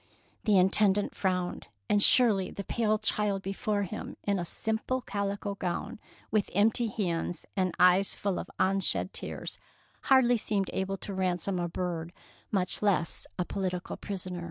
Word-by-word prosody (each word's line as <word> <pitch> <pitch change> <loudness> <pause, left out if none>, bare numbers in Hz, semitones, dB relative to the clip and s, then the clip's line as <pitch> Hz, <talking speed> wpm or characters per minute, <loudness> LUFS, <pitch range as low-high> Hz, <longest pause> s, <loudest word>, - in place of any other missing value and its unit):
The 210 -3 +5
Intendant 195 +2 +4
frowned; 180 -2 -2 0.2
and 205 - +3
surely 205 -6 +5
the 200 - -6
pale 215 +1 +1
child 210 -2 -1
before 205 +1 -1
him, 205 +3 -6
in 200 -2 0
a - - -1
simple 220 +7 -2
calico 200 -1 -3
gown, 185 +1 -4 0.3
with 215 -2 +1
empty 225 +4 +3
hands 175 -5 -2
and 185 -2 0
eyes 180 +2 +5
full 200 -3 -1
of - - -7
unshed 195 0 +1
tears, - - -5 0.5
hardly 260 -3 +5
seemed 205 -3 -1
able 195 +1 -2
to 200 - -6
ransom 185 0 -1
a 175 0 -1
bird, 175 -1 -3 0.4
much 185 -3 0
less 185 -6 0
a 180 - 0
political 185 -2 -3
prisoner. 185 -3 -5
195 Hz, 150 wpm, -29 LUFS, 180-210 Hz, 0.5 s, The